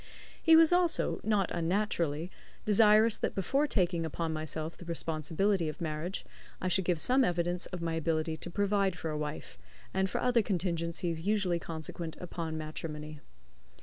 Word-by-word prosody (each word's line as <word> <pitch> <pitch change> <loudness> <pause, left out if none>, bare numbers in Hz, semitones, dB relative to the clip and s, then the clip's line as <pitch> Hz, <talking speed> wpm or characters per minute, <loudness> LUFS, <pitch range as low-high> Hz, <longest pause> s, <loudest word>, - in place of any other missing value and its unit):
He 325 - +7
was 325 +1 +7
also, 355 -2 +2
not 210 -3 +1
unnaturally, 170 -2 -1 0.3
desirous 215 +1 +5
that - - -1
before 270 - +1
taking 175 - +1
upon 160 0 -2
myself 155 +1 -4
the 175 - -12
responsibility 165 +2 0
of 155 - -7
marriage 165 +3 -3 0.3
I 185 - -1
should 185 +1 +2
give 175 -3 +1
some 260 +9 +3
evidence 175 -2 0
of 180 -2 -6
my 165 -1 -1
ability 160 0 0
to 175 - -7
provide 200 0 +1
for 160 -1 -3
a 150 - -2
wife, 150 - -6 0.3
and 190 0 +1
for - - -1
other 245 -2 +3
contingencies 170 -3 -1
usually 195 -2 +1
consequent 160 0 -6
upon 165 -3 -4
matrimony. 155 -1 -6
170 Hz, 155 wpm, -31 LUFS, 160-200 Hz, 0.3 s, He